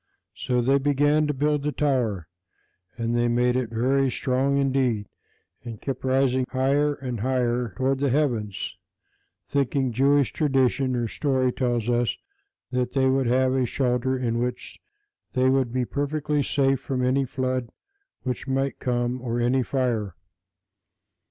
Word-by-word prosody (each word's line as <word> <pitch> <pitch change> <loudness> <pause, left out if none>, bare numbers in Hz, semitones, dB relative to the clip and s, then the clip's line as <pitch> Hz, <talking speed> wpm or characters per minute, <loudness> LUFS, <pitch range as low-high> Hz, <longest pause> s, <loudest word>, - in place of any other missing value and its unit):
So 125 -1 -1
they 135 +3 +3
began 145 +2 +2
to 150 - 0
build 150 +1 +1
the 150 +1 -1
tower, 120 - 0 0.7
and 115 0 -1
they 120 0 +2
made 125 +1 +2
it 130 -3 -1
very 130 +4 +1
strong 130 +3 0
indeed, 130 -6 +1 0.6
and 115 -3 -7
kept 135 -2 -5
raising 130 0 +2
it 125 - -4
higher 140 +3 +1
and 125 -4 -5
higher 120 -3 0
toward 130 +1 +1
the 140 0 +1
heavens, 120 -8 -1 0.7
thinking, 135 -2 0
Jewish 140 0 +2
tradition, 135 -2 +1
or 120 -1 -1
story, 130 0 0
tells 120 -3 -1
us, 120 -1 +1 0.5
that 125 -1 -1
they 135 -1 +3
would 135 -1 +1
have 130 +1 +2
a 130 -2 +1
shelter 130 +1 0
in 120 -2 -1
which 125 0 -4 0.5
they 130 +1 +3
would 130 -3 +1
be 125 0 0
perfectly 150 +2 -1
safe 135 -1 +1
from 130 -1 -2
any 135 +2 +2
flood 130 -2 -2 0.5
which 125 +1 -4
might 135 +1 -1
come, 120 0 -1
or 120 -1 -2
any 125 +2 +2
fire. 120 -8 -1
130 Hz, 150 wpm, -25 LUFS, 120-135 Hz, 0.7 s, they